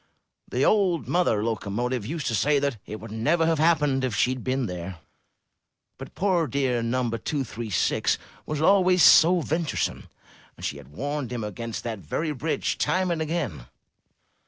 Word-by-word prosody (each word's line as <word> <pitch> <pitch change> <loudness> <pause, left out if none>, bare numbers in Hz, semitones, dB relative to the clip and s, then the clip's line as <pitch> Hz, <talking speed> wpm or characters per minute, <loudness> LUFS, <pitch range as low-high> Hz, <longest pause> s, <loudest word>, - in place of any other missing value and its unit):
The - - +1
old 190 -6 +2
mother 170 -12 +1
loco 110 -2 -2
motive 120 +1 -2
used 155 0 -4
to 120 - -1
say 145 +8 +2
that 140 -4 -1
it 110 - -6
would 115 -1 -10
never 150 +10 +1
have 165 -2 +1
happened 150 -5 +2
if 125 -4 -1
she 125 - +2
had 130 -2 -5
been 130 0 0
there; 90 -2 -6 1.0
but - - -10
poor 180 -5 +1
dear 130 -4 0
No. 120 +2 0
236 115 - -1 0.3
was 150 0 -2
always 185 -2 +5
so 170 +4 +7
venturesome, 160 0 -2 0.5
and - - -7
she 70 - -3
had 70 -2 -12
warned 135 - -4
him 120 -3 -3
against 115 +2 -5
that 115 -3 -4
very 150 - -3
bridge 150 +3 -2
time 185 0 +1
and 165 -2 -1
again. 150 - -3
135 Hz, 165 wpm, -25 LUFS, 115-160 Hz, 1.0 s, so